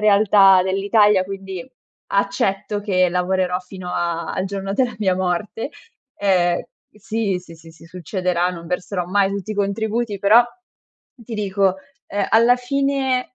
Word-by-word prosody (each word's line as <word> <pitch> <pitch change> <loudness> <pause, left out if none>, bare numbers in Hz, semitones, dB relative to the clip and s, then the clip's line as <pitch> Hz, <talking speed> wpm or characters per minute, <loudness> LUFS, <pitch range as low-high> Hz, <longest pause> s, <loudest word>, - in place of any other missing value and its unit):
realtà 200 -2 +5
dell'Italia, 200 +1 +3
quindi, 195 +4 -7 0.5
accetto 200 +1 0
che 185 -3 +2
lavorerò 180 0 0
fino 185 0 -10
a 170 -1 -2
al 185 - -2
giorno 195 0 -4
della 250 0 0
mia 190 -3 +1
morte, 190 - -2 0.5
ehm, 180 -3 +2
uhm, - - -6 0.4
sì, 210 -3 -1
sì, 170 -2 -14
sì, 165 0 -15
sì, 165 - -17
succederà 180 0 -1
non 170 -2 -9
verserò 180 0 -3
mai 195 +1 +2
tutti 200 +1 -5
i - - -7
contributi, 210 +1 -1
però 220 +5 +6 0.7
ti 235 -2 -9
dico, 195 -2 +1 0.3
ehm, 200 -1 -2
alla 230 +2 +5
fine 265 -1 -1
195 Hz, 145 wpm, -20 LUFS, 180-210 Hz, 0.7 s, però